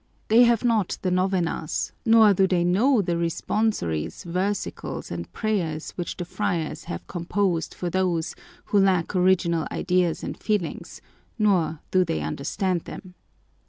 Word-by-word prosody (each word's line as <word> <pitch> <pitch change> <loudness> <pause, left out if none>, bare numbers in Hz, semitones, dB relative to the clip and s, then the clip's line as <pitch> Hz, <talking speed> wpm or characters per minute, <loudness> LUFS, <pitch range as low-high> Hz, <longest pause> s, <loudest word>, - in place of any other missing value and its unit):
They 235 +3 +7
have 235 -1 +3
not 225 -6 +1
the 185 - +1
novenas, 180 -4 0 0.2
nor 225 -2 +7
do 190 0 +3
they 180 -2 +1
know 210 +7 +3
the 175 - -1
responsories, 165 - -1
versicles, 185 +4 -3
and 85 0 -5
prayers 170 -8 -2
which 175 - -5
the 175 - -4
friars 170 -2 -3
have 85 - -6
composed 175 0 -1
for 175 -1 -3
those 180 -3 0 0.3
who 205 - +2
lack 190 -2 +2
original 180 -3 +2
ideas 180 -2 0
and - - -4
feelings, 210 -6 -3 0.4
nor 185 -8 +1
do 185 0 +4
they 80 - -2
understand 165 - -2
them. 185 -2 -9
180 Hz, 140 wpm, -25 LUFS, 170-200 Hz, 0.4 s, They